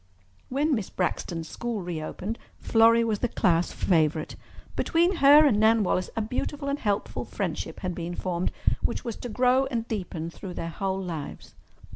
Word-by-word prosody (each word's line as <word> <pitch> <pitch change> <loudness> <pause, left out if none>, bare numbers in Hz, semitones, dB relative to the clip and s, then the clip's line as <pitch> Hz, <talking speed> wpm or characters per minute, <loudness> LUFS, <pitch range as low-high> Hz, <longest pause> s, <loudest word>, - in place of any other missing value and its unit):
When 290 +4 +1
Miss 215 -7 -1
Braxton's 170 -2 -2
school 235 -1 -4
reopened 175 +6 -4 0.2
Florrie 230 +1 +4
was 220 -3 0
the 245 - +1
class 175 -6 +2
favourite. 155 -3 +1 0.4
Between 345 +2 +2
her 295 +1 +8
and 220 -8 +3
Nan 220 0 +5
Wallace 185 -1 0
a 225 - 0
beautiful 280 +5 -3
and 280 +1 -1
helpful 205 -5 -1
friendship - - -4
had 185 -2 -2
been 170 0 -5
formed 180 -1 -2 0.3
which - - -2
was 230 -3 -3
to 245 - -6
grow 255 +3 +3
and 235 -3 -3
deepen 180 -6 -4
through 180 +1 -8
their 165 - -4
whole 190 +2 -2
lives. 165 -6 -6
210 Hz, 165 wpm, -27 LUFS, 175-245 Hz, 0.4 s, her